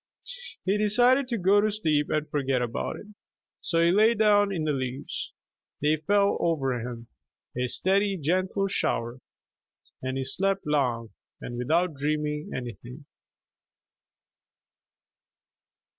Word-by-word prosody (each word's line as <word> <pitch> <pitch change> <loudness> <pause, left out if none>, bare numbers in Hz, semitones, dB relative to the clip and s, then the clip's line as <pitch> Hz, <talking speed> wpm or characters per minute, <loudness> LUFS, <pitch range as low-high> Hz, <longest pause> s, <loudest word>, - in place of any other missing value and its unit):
He 195 +2 +1
decided 245 +6 +4
to 240 -2 -2
go 200 +2 +4
to 215 - +2
sleep 155 -8 0
and 155 0 -1
forget 135 -3 0
about 120 -2 -3
it. - - -10 0.6
So 165 - 0
he 170 - +4
lay 215 +5 +4
down 205 -2 +4
in 170 -5 -2
the 155 - +1
leaves. 130 -1 -4 0.5
They 150 +2 +2
fell 200 +6 +2
over 135 -7 0
him, 120 0 -7 0.5
a 125 +1 0
steady, 195 +8 +1
gentle 185 +5 0
shower, 120 -10 -1 0.8
and 130 +1 -3
he 135 - -1
slept 195 +9 0
long, 125 -7 0 0.3
and 120 - -7
without 160 +8 +1
dreaming 150 +1 -2
anything. 125 +3 -7
155 Hz, 125 wpm, -27 LUFS, 130-200 Hz, 0.8 s, decided